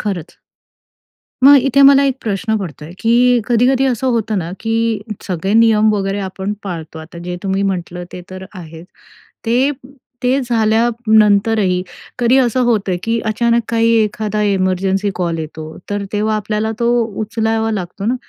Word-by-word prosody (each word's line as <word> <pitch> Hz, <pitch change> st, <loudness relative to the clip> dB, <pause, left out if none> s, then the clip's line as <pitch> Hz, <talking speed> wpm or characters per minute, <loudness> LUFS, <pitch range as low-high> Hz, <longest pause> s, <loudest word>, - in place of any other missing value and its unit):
खरंच. 185 Hz, -6 st, -5 dB, 1.1 s
मग 285 Hz, +1 st, +9 dB
इथे 275 Hz, +1 st, +3 dB
मला 275 Hz, 0 st, +7 dB
एक 270 Hz, -2 st, 0 dB
प्रश्न 220 Hz, +1 st, -1 dB
पडतोय, 155 Hz, -5 st, -8 dB
की 245 Hz, +1 st, +3 dB
कधी-कधी 250 Hz, +2 st, +2 dB
असं 260 Hz, 0 st, -1 dB
होतं 225 Hz, -3 st, -1 dB
ना, 170 Hz, -2 st, -4 dB
की 225 Hz, -1 st, 0 dB, 0.2 s
सगळे 185 Hz, +2 st, -3 dB
नियम 220 Hz, -1 st, +4 dB
वगैरे 195 Hz, 0 st, -2 dB
आपण 190 Hz, +2 st, -4 dB
पाळतो. 165 Hz, -5 st, -7 dB
आता 160 Hz, +2 st, -11 dB
जे 180 Hz, 0 st, -4 dB
तुम्ही 195 Hz, 0 st, -1 dB
म्हटलं 180 Hz, -2 st, -3 dB
ते 180 Hz, -, -7 dB
तर 185 Hz, 0 st, -8 dB
आहेच. 165 Hz, -2 st, -10 dB, 0.6 s
ते 250 Hz, +5 st, +2 dB, 0.5 s
ते 255 Hz, +2 st, +2 dB
झाल्यानंतरही 220 Hz, -4 st, +2 dB, 0.4 s
कधी 245 Hz, +1 st, +3 dB
असं 255 Hz, -1 st, +1 dB
होतं, 205 Hz, -6 st, 0 dB
की 230 Hz, 0 st, 0 dB
अचानक 235 Hz, +2 st, +1 dB
काही 230 Hz, 0 st, +2 dB
एखादा 215 Hz, -1 st, -2 dB
इमर्जन्सी 195 Hz, 0 st, 0 dB
कॉल 170 Hz, -2 st, -2 dB
येतो. 155 Hz, 0 st, -7 dB
तर 205 Hz, 0 st, -2 dB
तेव्हा 215 Hz, +1 st, 0 dB
आपल्याला 215 Hz, +1 st, -2 dB
तो 235 Hz, -, +1 dB, 0.3 s
उचलावा 220 Hz, +1 st, -1 dB
लागतो 195 Hz, -1 st, -5 dB
ना, 240 Hz, -, +1 dB
215 Hz, 150 wpm, -16 LUFS, 190-230 Hz, 1.1 s, मग